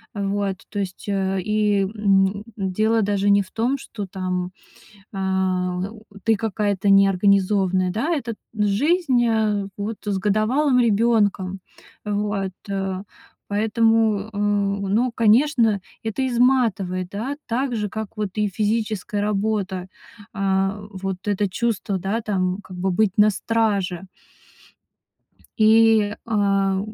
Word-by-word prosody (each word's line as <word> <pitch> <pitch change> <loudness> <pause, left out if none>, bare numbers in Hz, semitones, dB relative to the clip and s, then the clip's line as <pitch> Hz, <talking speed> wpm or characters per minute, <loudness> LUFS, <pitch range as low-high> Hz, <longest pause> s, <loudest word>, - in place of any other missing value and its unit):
Э, 200 -1 -2
вот, 200 -1 -1
то 205 - -4
есть, 190 -2 -5
э, 195 -1 0
и, 210 0 +1
м, 200 -1 +1
дело 215 +3 +1
даже 200 0 +1
не 200 0 +4
в 185 - -19
том, 245 +5 0
что 210 -6 -7
там, 185 -1 -3 0.6
а, 190 -2 -1 0.5
ты 225 0 +4
какая-то 205 -2 -1
неорганизованная, 195 -1 +3
да. 275 - -1
Это 245 -7 -3
т - - -19 0.2
жизнь, 245 - +2
э, 215 -3 +1
вот, 210 +2 -4
с 200 -2 0
годовалым 235 +7 +2
ребёнком. 205 -4 +2 0.5
Вот, 205 -2 -1 0.2
э, 195 -1 -3 0.4
поэтому, 220 0 +2
э, 205 - -6
ну, 205 +3 +1
конечно, 230 -1 +3 0.2
это 225 +4 -2
изматывает, 230 -8 +1
да, 235 +9 -4
так 250 +2 -1
же 210 -2 -2
как 220 +1 -6
вот 210 -3 -2
и 210 -1 +1
физическая 215 0 -1
работа. 200 -3 -1 0.5
А 195 0 0
вот 190 -1 -4
это 205 0 +1
чувство, 210 -2 -1
да, 200 +5 -2
там, 185 -3 -1
как 185 - -11
бы 185 +1 0
быть 195 +1 +1
на 210 +1 +6
страже 200 -5 -1 1.5
и, 220 -1 +5
а, 195 -3 +1
205 Hz, 125 wpm, -22 LUFS, 195-220 Hz, 1.5 s, на